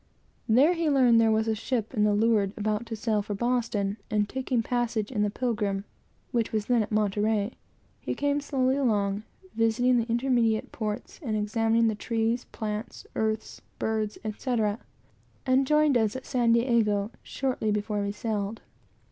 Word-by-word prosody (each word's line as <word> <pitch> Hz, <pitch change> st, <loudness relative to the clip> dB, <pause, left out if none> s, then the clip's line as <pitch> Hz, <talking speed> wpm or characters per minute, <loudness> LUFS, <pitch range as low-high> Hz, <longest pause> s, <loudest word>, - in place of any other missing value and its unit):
There 270 Hz, +10 st, +5 dB
he 335 Hz, -2 st, 0 dB
learned 250 Hz, -5 st, +5 dB
that -, -, +4 dB
there -, -, +4 dB
was 220 Hz, +1 st, +1 dB
a 220 Hz, -, +2 dB
ship 225 Hz, +1 st, -2 dB
at 210 Hz, -4 st, +2 dB
the 210 Hz, 0 st, +3 dB
leeward, 210 Hz, -2 st, +2 dB
about 215 Hz, +2 st, -1 dB
to 225 Hz, -, -4 dB
sail 215 Hz, -1 st, 0 dB
for 205 Hz, 0 st, -4 dB
Boston; 225 Hz, -3 st, 0 dB
and, 210 Hz, -1 st, +1 dB
taking 255 Hz, -1 st, -1 dB
passage 235 Hz, -3 st, -1 dB
in 215 Hz, -5 st, -1 dB
the 210 Hz, -, +2 dB
Pilgrim, 210 Hz, -4 st, -1 dB, 0.5 s
which 235 Hz, -3 st, 0 dB
was 215 Hz, -1 st, -1 dB
then 240 Hz, -1 st, +3 dB
at 215 Hz, -, -4 dB
Monterey, 210 Hz, +1 st, +1 dB, 0.5 s
he -, -, -3 dB
came 285 Hz, 0 st, 0 dB
slowly 260 Hz, -2 st, +1 dB
down, 210 Hz, -5 st, 0 dB, 0.3 s
visiting 235 Hz, +2 st, +2 dB
the 230 Hz, +1 st, -2 dB
intermediate 235 Hz, -2 st, +1 dB
ports, 215 Hz, -2 st, -5 dB
and 220 Hz, -7 st, -2 dB
examining 225 Hz, +2 st, +2 dB
the 220 Hz, -, +1 dB
trees, 225 Hz, +2 st, -1 dB
plants, 215 Hz, -1 st, -5 dB
earths, 220 Hz, 0 st, -2 dB, 0.2 s
birds, 215 Hz, -1 st, -1 dB
etc., 215 Hz, -1 st, -1 dB, 0.7 s
and 260 Hz, 0 st, +3 dB
joined 300 Hz, -1 st, +4 dB
us 220 Hz, -2 st, +2 dB
at 260 Hz, -, -6 dB
San 240 Hz, -2 st, +2 dB
Diego 230 Hz, -4 st, +2 dB
shortly 255 Hz, -5 st, -2 dB
before 210 Hz, 0 st, -1 dB
we 200 Hz, 0 st, -1 dB
sailed. 210 Hz, 0 st, -3 dB
225 Hz, 165 wpm, -27 LUFS, 210-245 Hz, 0.7 s, There